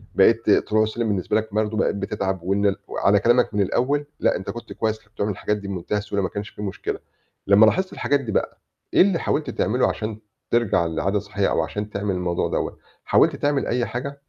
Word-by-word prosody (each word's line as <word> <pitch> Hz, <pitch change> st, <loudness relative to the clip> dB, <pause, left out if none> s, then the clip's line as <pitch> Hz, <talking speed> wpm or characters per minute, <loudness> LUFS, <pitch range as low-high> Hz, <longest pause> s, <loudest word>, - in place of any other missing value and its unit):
بقيت 110 Hz, +3 st, +4 dB
طلوع 110 Hz, +1 st, +3 dB
سلِّم 110 Hz, +1 st, -2 dB
بالنسبة 100 Hz, +1 st, 0 dB
لك 110 Hz, -1 st, -3 dB
برضه 110 Hz, 0 st, 0 dB
بقيت -, -, +1 dB
بتتعب 100 Hz, -2 st, -3 dB
وإن 100 Hz, +2 st, +1 dB
ال 100 Hz, -, +3 dB
وعلى 100 Hz, +1 st, +2 dB
كلامك 120 Hz, +1 st, +3 dB
من 105 Hz, -, +1 dB
الأوّل 140 Hz, +9 st, +1 dB
لأ، -, -, +2 dB
أنت 95 Hz, -, -5 dB
كنت 120 Hz, -, -7 dB
كويّس، 110 Hz, -1 st, -1 dB
كنت 105 Hz, 0 st, -29 dB
بتعمل 100 Hz, 0 st, -1 dB
الحاجات 105 Hz, +2 st, -1 dB
دي 100 Hz, -1 st, -8 dB
بمنتهى 95 Hz, +2 st, -2 dB
السهولة 100 Hz, -1 st, -2 dB
ما -, -, -1 dB
كانش 105 Hz, 0 st, -5 dB
في -, -, -11 dB
مشكلة، 100 Hz, -2 st, -4 dB, 0.5 s
لمّا 100 Hz, +2 st, +7 dB
لاحظت 185 Hz, +12 st, +1 dB
الحاجات 140 Hz, 0 st, +1 dB
دي 120 Hz, -5 st, -5 dB
بقى -, -, -1 dB, 0.3 s
إيه -, -, +6 dB
اللي 190 Hz, -3 st, +4 dB
حاولت 150 Hz, -, -1 dB
تعمله 125 Hz, +4 st, +1 dB
عشان 110 Hz, 0 st, -4 dB, 0.3 s
ترجع 115 Hz, -7 st, +2 dB
لعادة 90 Hz, +5 st, 0 dB
صحّية -, -, -1 dB
أو -, -, +1 dB
عشان 105 Hz, 0 st, -4 dB
تعمل 100 Hz, -2 st, -2 dB
الموضوع 90 Hz, -1 st, -1 dB
دَوّة، -, -, -2 dB, 0.3 s
حاولت -, -, +4 dB
تعمل 145 Hz, -1 st, 0 dB
أي 120 Hz, 0 st, 0 dB
حاجة؟ 140 Hz, +3 st, -5 dB
105 Hz, 210 wpm, -23 LUFS, 100-120 Hz, 0.5 s, لمّا